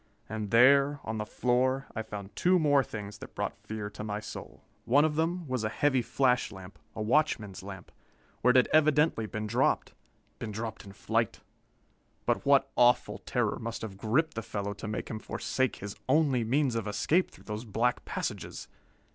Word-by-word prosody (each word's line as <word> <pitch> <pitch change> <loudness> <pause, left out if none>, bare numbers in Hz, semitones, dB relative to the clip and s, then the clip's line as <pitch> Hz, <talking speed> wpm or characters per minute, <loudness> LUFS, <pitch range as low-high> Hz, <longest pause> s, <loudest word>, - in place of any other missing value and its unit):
And 110 -1 -4
there, 140 +5 +5
on 110 0 -3
the 105 - -3
floor, 130 +3 +1
I 110 - -1
found 105 -2 -8
two 185 +1 +4
more 145 -4 +4
things 105 -3 -7
that - - -11
brought - - -2
fear 110 -1 -4
to 105 - -7
my 105 -1 -3
soul. 110 - -9 0.2
One 140 +6 +5
of 155 - +1
them 165 +1 -1
was 130 -3 -2
a 110 - 0
heavy 135 +2 +2
flash 125 0 +1
lamp 95 0 -11 0.2
a 110 - -3
watchman's 110 -6 +1
lamp 95 -2 -9 0.5
where 125 - +4
it 125 - +5
had 125 - +5
evidently 155 -6 +4
been 110 +1 -4
dropped. 120 +5 +1 0.5
Been 110 - -4
dropped 110 0 -5
in 100 - -10
flight! - - -1 0.8
But - - 0
what 135 -1 +4
awful 120 0 +3
terror - - -1
must 115 0 -5
have 105 -3 -6
gripped 120 +11 +1
the 115 - -3
fellow 100 -2 -4
to 105 - -7
make 105 -1 -3
him 110 - -5
forsake 130 +3 -1
his 100 0 -7
only 135 -4 +3
means 130 +3 +1
of 115 -2 -2
escape 150 - +1
through - - -17
those 105 +1 -5
black 120 +2 0
passages? - - -5
115 Hz, 185 wpm, -30 LUFS, 105-140 Hz, 0.8 s, there